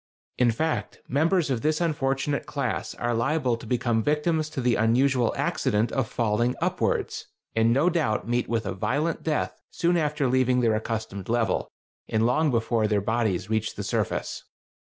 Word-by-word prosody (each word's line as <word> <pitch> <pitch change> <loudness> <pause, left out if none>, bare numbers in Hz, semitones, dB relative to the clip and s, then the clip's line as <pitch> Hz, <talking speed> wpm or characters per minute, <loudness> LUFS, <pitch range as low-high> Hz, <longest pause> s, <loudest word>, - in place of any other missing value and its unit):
In 125 -1 +5
fact, 155 +8 -2
members 160 +2 +2
of 120 -3 -1
this 155 +2 +1
unfortunate 140 -3 -1
class 135 -5 -3
are 120 0 -1
liable 125 +1 +1
to 115 -1 -10
become 120 -1 +1
victims 155 +4 0
to 140 - -5
the 125 -1 +2
unusual 120 +2 +3
accident 120 -10 0
of 135 -4 0
falling 120 +2 0
upwards, - - -1 0.3
and 115 +1 +3
no 140 +8 +3
doubt 155 -12 0
meet 120 +1 0
with 115 -2 0
a 100 - -2
violent 145 - -1
death 155 -2 -2
soon 175 0 +1
after 150 -3 0
leaving 125 0 +2
their 115 -2 +3
accustomed 110 -3 -4
level, 115 -1 0 0.4
and 110 +1 +2
long 150 +6 +2
before 115 -2 +1
their 105 -1 +2
bodies 105 -3 0
reach 110 0 -1
the - - -4
surface.... - - -2
125 Hz, 165 wpm, -26 LUFS, 115-150 Hz, 0.4 s, In